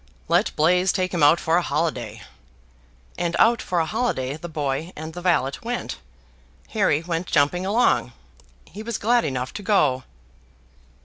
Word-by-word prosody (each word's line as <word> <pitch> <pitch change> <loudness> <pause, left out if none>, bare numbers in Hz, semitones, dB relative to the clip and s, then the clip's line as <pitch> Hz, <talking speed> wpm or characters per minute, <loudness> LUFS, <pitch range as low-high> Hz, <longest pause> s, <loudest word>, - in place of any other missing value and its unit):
"Let 175 +6 +2
Blaise 180 +4 +3
take 185 -1 -1
him 170 - -1
out 150 +4 +6
for 165 +1 +2
a - - +3
holiday," 145 -8 -2 1.0
and 175 -1 -1
out 230 0 +4
for 180 - -1
a 165 - +1
holiday 160 - -1
the 175 +3 -8
boy 150 +2 -3
and 160 +1 -7
the 175 - -7
valet 170 -7 +2
went. 240 +1 -4 0.7
Harry 180 -8 +1
went 170 +1 -3
jumping 175 +6 +1
along; 225 +5 +2 0.5
he 210 - -10
was 230 +1 -3
glad 235 +2 +2
enough 130 -1 -3
to 205 - -6
go. 150 -11 +2
170 Hz, 160 wpm, -23 LUFS, 150-195 Hz, 1.0 s, out